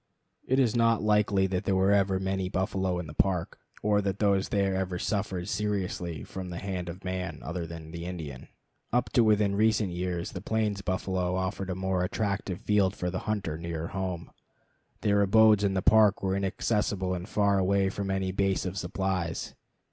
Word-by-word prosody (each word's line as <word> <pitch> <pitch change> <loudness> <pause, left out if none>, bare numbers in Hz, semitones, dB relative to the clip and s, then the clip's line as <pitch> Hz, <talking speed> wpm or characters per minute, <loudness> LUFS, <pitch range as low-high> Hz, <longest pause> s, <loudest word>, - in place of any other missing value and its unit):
It 130 - +2
is 125 -4 +3
not 115 -2 +3
likely 105 -2 +3
that 95 -1 -2
there 95 0 +3
ever 100 -1 +3
were - - 0
many 95 -1 -1
buffalo 95 -1 -1
in 90 - -4
the 75 - -9
Park, 90 +1 0 0.2
or 105 -1 +3
that 100 -1 -2
those 100 -2 +2
there 100 -1 +1
ever 95 -1 -1
suffered 95 -2 -2
seriously 100 -6 -2
from 95 -1 -7
the 85 - -5
hand 90 -2 -4
of 90 +3 -8
man 90 -4 -3
other 85 +1 -4
than 80 -1 -9
the 85 +1 -6
Indian. 80 -8 -6 0.4
Up 125 +1 +1
to 120 - +4
within 105 -2 +3
recent 110 -2 +2
years 90 -1 -3
the - - -6
plains 105 -3 -1
buffalo 95 -1 -1
offered 95 +1 -2
a 90 - -2
more 95 -1 0
attractive 100 -1 -2
field 100 -2 +2
for 90 0 -2
the 95 - -2
hunter 95 -7 -2
nearer 85 -1 -4
home. 95 -3 -4 0.7
Their 100 -1 +3
abodes 105 +1 +5
in 100 -1 +1
the 95 - 0
Park 105 -3 +5
were 95 0 +1
inaccessible 100 -1 0
and 90 +3 -5
far 100 -1 +2
away 95 +1 +2
from 100 -1 -4
any 95 -1 0
base 95 0 0
of 95 +1 -3
supplies. 90 -2 -2
95 Hz, 185 wpm, -28 LUFS, 90-100 Hz, 0.7 s, abodes